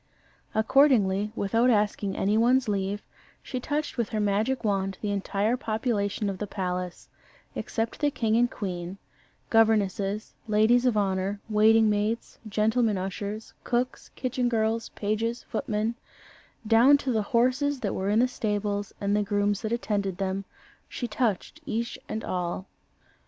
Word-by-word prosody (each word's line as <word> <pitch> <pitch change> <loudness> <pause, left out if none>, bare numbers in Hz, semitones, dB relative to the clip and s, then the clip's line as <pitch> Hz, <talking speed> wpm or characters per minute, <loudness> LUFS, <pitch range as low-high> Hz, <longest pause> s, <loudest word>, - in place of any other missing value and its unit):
Accordingly, 220 -4 +4
without 230 +5 +2
asking 210 -3 +1
any 205 +2 +1
one's 245 +3 +3
leave, 200 0 -1 0.4
she 255 - -4
touched 295 +3 -2
with 235 - 0
her 215 - -2
magic 210 +5 +1
wand 195 -2 0
the 210 - -2
entire 200 +3 0
population 215 -3 -1
of 195 -2 -3
the 210 - -3
palace 180 -2 -4 0.5
except 225 0 -3
the 295 - +3
king 225 -5 0
and 240 +1 +4
queen; 180 -3 -5 0.5
governesses, 210 -2 +2
ladies 225 +4 +4
of 230 -4 +2
honour, 195 0 0
waiting 220 +1 +5
maids, 210 +2 -1
gentlemen 220 +1 +2
ushers, 200 +3 -5
cooks, 245 +1 -1
kitchen 255 -1 -1
girls, 225 0 0
pages, 220 +3 -2
footmen 220 0 -2 0.7
down 235 +6 +6
to 275 -2 -2
the 220 -2 +1
horses 255 +6 +1
that 200 - -1
were 190 +1 -1
in 210 - +3
the 245 +2 +4
stables, 205 -3 -2
and 200 0 +1
the 210 - +2
grooms 205 0 0
that 220 - -3
attended 205 -5 -1
them, 195 +1 -2 0.4
she 245 - -4
touched 215 -3 -1
each 235 +2 -2
and 220 - -3
all. 180 0 -3
215 Hz, 145 wpm, -27 LUFS, 200-235 Hz, 0.7 s, down